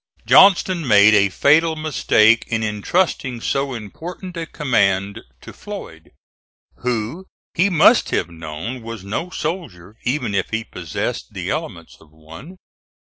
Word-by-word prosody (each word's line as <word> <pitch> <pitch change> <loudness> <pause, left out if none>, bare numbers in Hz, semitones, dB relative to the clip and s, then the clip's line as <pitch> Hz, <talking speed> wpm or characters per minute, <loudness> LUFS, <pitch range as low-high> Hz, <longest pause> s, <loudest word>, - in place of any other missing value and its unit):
Johnston 185 -4 +5
made 105 -1 +6
a 100 -2 +4
fatal 160 - +3
mistake 115 -7 +2
in 115 -1 -2
intrusting 125 - -1
so 135 +2 -2
important 170 - -8
a 165 -1 -5
command 100 -9 0 0.2
to - - -11
Floyd, - - -10 0.7
who 125 - -3 0.3
he 180 +4 +2
must 185 +7 +4
have 85 - -1
known 80 +9 -7
was 115 -3 -8
no 110 - -4
soldier 130 - -6
even 125 -4 -2
if 95 -1 -1
he 110 0 -2
possessed 85 -7 -5
the - - -3
elements - - -6
of 80 - -20
one. 80 - -13
115 Hz, 135 wpm, -20 LUFS, 100-160 Hz, 0.7 s, made